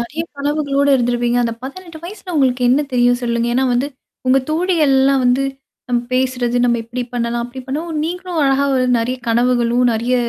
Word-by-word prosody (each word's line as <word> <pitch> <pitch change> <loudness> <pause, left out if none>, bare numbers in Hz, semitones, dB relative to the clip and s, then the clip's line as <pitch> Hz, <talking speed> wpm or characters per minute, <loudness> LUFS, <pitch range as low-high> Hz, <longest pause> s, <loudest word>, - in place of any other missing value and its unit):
நெறைய 290 +7 -4
கனவுகளோடு 285 -1 0
இருந்திருப்பீங்க. 240 0 +1
அந்த 230 -1 -2
18 330 +4 -9
வயசுல 370 0 -8
உங்களுக்கு 255 -3 +2
என்ன 270 +4 +4
தெரியும் 245 0 +3
சொல்லுங்க. 235 -1 0
ஏன்னா 265 +1 +2
வந்து 245 +3 +1 0.4
உங்க 255 +1 +5
தோழிகள்லாம் 290 -6 +2
வந்து 250 +2 +3 0.5
நம்ப 240 -1 +1
பேசுறது 250 -2 0
நம்ம 235 -1 +2
எப்படி 245 +2 -4
பண்ணலாம். 235 0 -1
அப்படி 245 +2 -8
பண்ணலாம் 310 +4 -3
நீங்களும் 355 0 -3
அழகா 275 +1 +2
வந்து 255 -1 +1
நெறைய 250 +3 -2
கனவுகளும், 240 +1 +2
நறைய 235 +3 0
255 Hz, 165 wpm, -18 LUFS, 240-285 Hz, 0.5 s, உங்க